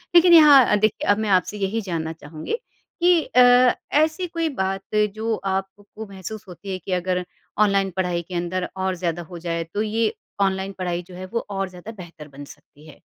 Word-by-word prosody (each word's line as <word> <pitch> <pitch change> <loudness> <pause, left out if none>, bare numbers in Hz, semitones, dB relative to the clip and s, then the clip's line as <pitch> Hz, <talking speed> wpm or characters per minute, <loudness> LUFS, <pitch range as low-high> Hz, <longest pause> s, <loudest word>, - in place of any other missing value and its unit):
लेकिन 345 0 +7
यहाँ 280 -9 +7
देखिए 215 0 0
अब 205 - +4
मैं 215 -1 -1
आपसे 190 +2 +1
यही 205 +3 -1
जानना 165 -4 -4
चाहूँगी 155 - -8 0.5
कि 350 -2 +5
अ, 250 0 +5 0.2
ऐसी 315 +4 +2
कोई 330 -1 -2
बात 195 -4 -3 0.2
जो 220 0 -1
आपको 195 +3 -5
महसूस 200 +2 -8
होती 190 +2 -9
है 185 - -2
कि 185 - -8
अगर 180 0 0 0.4
ऑनलाइन 195 -1 +1
पढ़ाई 180 -2 0
के 175 +1 -9
अंदर 180 +1 -2
और 190 -1 -1
ज़्यादा 175 -1 -3
हो 170 +1 -10
जाए, 165 -1 -3
तो 190 +6 -4
ये 220 0 0 0.3
ऑनलाइन 190 0 0
पढ़ाई 175 -1 -2
जो 180 - -12
है 185 - -7
वो 230 - -2
और 195 -1 -3
ज़्यादा 180 +4 -10
बेहतर 175 -7 -11
बन 140 0 -11
सकती 150 +1 -17
है? 150 - -15
190 Hz, 190 wpm, -22 LUFS, 175-220 Hz, 0.5 s, लेकिन